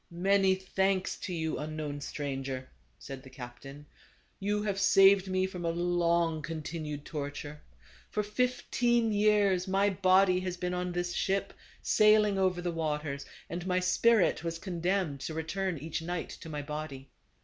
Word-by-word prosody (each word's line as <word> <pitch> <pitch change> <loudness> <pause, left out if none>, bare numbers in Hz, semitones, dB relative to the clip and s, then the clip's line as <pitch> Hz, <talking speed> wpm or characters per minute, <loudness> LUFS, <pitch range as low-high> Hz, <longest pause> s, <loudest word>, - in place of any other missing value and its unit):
" - - -42
Many 190 +2 +3
thanks 190 0 0
to 185 - -6
you, 160 -2 -2
unknown 150 -1 -4
stranger," 135 -2 -4 0.3
said 135 -1 -8
the 130 - -13
captain, 135 +3 -10 0.5
"you 205 +1 0
have 200 -2 -1
saved 195 -1 +6
me 185 0 +1
from 180 -2 -6
a 170 - 0
long 170 -1 +1
continued 155 -2 -5
torture. 145 0 -6 0.5
For 210 - -1
fifteen 240 +1 +1
years 205 -3 +3
my 195 +2 +2
body 185 0 +4
has 185 -1 -4
been 180 0 -2
on 180 0 -2
this 175 0 -2
ship, 195 0 -1 0.3
sailing 210 -2 +4
over 185 -2 +1
the 175 - -1
waters; 150 -3 -3 0.2
and 175 +2 -5
my 180 0 +2
spirit 185 +1 +3
was 165 0 -3
condemned 175 -4 -1
to 155 +4 -5
return 180 +3 -2
each 160 +3 -4
night 175 +1 -4
to 165 - -9
my 150 -2 -4
body. 145 -2 -6
175 Hz, 155 wpm, -30 LUFS, 155-195 Hz, 0.5 s, saved